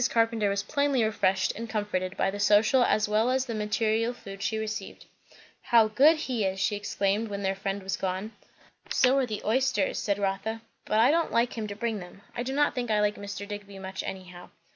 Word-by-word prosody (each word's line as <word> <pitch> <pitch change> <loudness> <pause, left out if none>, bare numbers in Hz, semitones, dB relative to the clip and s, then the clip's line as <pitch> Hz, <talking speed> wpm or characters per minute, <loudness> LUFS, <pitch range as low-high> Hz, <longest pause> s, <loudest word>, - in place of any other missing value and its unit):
Carpenter 225 -2 +2
was 200 0 -1
plainly 280 -3 +1
refreshed 195 -3 +1
and 230 +1 -6
comforted, 200 -4 -2
by 195 - +1
the 205 - -6
social 215 +5 +4
as 215 -3 +2
well 215 +3 +2
as 260 0 +1
the 235 - -4
material 220 +2 0
food 195 -4 -10
she 220 - -1
received. 220 0 -5 0.6
"How 225 -2 +4
good 285 +9 +5
he 255 -7 -2
is!" 190 0 -1
she 205 +2 +1
exclaimed 205 +1 -1
when 200 -1 -5
their 190 0 +1
friend 195 0 -4
was 195 +1 -2
gone. 190 +3 -3 0.6
"So 255 0 +3
are 260 - 0
the 215 -2 -5
oysters," 230 -3 +1
said 200 -1 0
Rotha; 205 +3 -2 0.2
"but 215 - 0
I 240 +5 +6
don't 335 +1 +1
like 235 +1 +1
him 220 -2 -3
to 205 - -6
bring 220 0 -2
them. 180 +2 -12
I 240 - -2
do 250 +2 -3
not 290 +2 +2
think 245 -2 -3
I 215 -1 +2
like 210 0 +2
Mr. 200 0 -6
Digby 205 -1 -8
much, 190 0 -5
anyhow." 180 -2 -8
210 Hz, 210 wpm, -28 LUFS, 200-230 Hz, 0.6 s, I